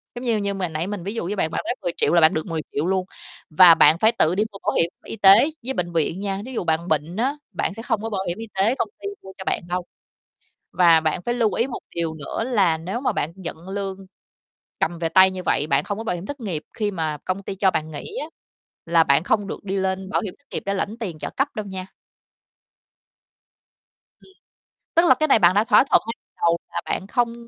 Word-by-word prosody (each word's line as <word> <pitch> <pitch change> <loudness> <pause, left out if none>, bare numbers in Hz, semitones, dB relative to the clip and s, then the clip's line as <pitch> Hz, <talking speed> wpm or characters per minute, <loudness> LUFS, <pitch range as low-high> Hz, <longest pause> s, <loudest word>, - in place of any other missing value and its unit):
Giống 245 - -6
như 230 -3 +2
như 200 -1 -1
mà 190 -2 -2
nãy 160 +3 -3
mình 205 -4 -5
ví 200 - -4
dụ 225 - -3
với 200 +4 -2
bạn, 160 -5 -1
bạn - - -2
nói - - 0
10.000.000 175 - 0
là 170 - +5
bạn 160 0 +6
được 155 - -2
10.000.000 160 -2 -3
luôn, 190 -1 0 0.4
và 170 +1 +8
bạn 160 - +6
phải 220 +3 +5
tự 175 -7 +2
đi 210 - +2
mua 195 - -10
bảo - - +1
hiểm 170 - +1 0.2
y - - -6
tế 200 +8 +7
với 265 +2 -2
bệnh 175 -4 -3
viện 165 +2 0
nha. 195 -1 -3
Thí 260 - -8
dụ - - -2
bạn 165 +1 0
bệnh 155 +3 -1
á, 265 +5 0 0.2
bạn - - -2
sẽ 225 - -8
không 215 -3 -1
có 225 - -3
bảo 195 -3 -2
hiểm 175 +3 -2
y 225 - -7
tế 205 +6 +2
công - - -2
ty - - -4 0.2
mua 190 - -10
cho 190 - -7
bạn - - 0
đâu. 180 0 -2 0.9
Và 170 -3 +5
bạn 160 +2 -1
phải 240 +6 -2
lưu 225 -5 +1
ý 235 - +1
một 250 - -6 0.2
điều 165 -2 -1
nữa 160 +8 -4
là 200 -10 +2
nếu 190 +10 -4
mà 270 - +1
bạn 155 - -2
nhận 175 -1 -8
lương 195 -1 -4 0.8
cầm 170 +1 -1
về 165 -1 -1
tay 190 +1 +6
như 185 -1 -6
vậy, 145 - +1
bạn 140 0 +2
không 205 - -4
có 225 - -5
bảo 200 -6 -1
hiểm 175 - -7
thất 285 +5 -6
nghiệp 180 -10 -4
khi 210 -3 -1
mà 160 -5 -2
công 190 +1 -2
ty 195 - -5
cho 190 -1 +3
bạn 155 0 -3
nghỉ 155 - -7
á, - - -5 0.6
là 165 -1 +4
bạn 140 +1 +3
không 205 +2 0
được - - -6
đi 195 0 -2
lên 190 0 -2
bảo - - 0
hiểm 195 -4 -5
thất 285 - -36
nghiệp - - -4
để 200 - 0
lãnh 205 +3 -3
tiền 180 -8 -5
trợ - - -4
cấp 275 - +2
đâu 215 -1 -4
nha. 190 -1 -6 2.3
Ừm, - - -20 0.7
tức 335 +1 +5
là - - +7
cái 310 - +1
này 250 - +5
bạn 180 0 +5
đã 210 - +4
thỏa - - +6
thuận - - +5
ngay 230 - -2
từ - - -86
đầu 170 0 +3 0.2
là - - -2
bạn 190 - -3
không 235 +2 0
190 Hz, 255 wpm, -23 LUFS, 170-215 Hz, 2.3 s, và